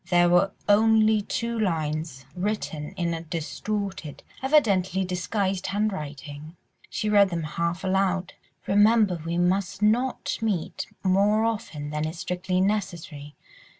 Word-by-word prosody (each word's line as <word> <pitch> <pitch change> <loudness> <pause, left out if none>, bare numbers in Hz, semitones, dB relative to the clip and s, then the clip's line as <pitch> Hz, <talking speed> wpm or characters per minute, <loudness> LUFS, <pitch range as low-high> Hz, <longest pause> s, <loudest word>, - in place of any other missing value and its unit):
There 175 -1 +4
were 180 +3 +4 0.2
only 215 +1 +4
two 235 +3 -3
lines, 155 -7 -2
written 180 -6 -3
in 170 -1 -1
a 165 - -4
distorted, 180 +1 -4 0.2
evidently 195 - +2
disguised, 185 +1 -2
handwriting; 155 -6 -4 0.3
she 215 - -3
read 205 -2 +5
them 170 -2 -3
half 170 +3 -2
aloud— 190 -1 0 0.3
"'Remember 205 -3 +4
we 170 +1 -2
must 185 +3 0
not 240 +5 +1
meet 205 -7 -2 0.2
more 200 +3 +3
often 210 -10 -3
than 150 +1 -1
is 160 +2 -6
strictly 180 +1 -1
necessary. 175 -7 -3
185 Hz, 120 wpm, -26 LUFS, 165-210 Hz, 0.3 s, read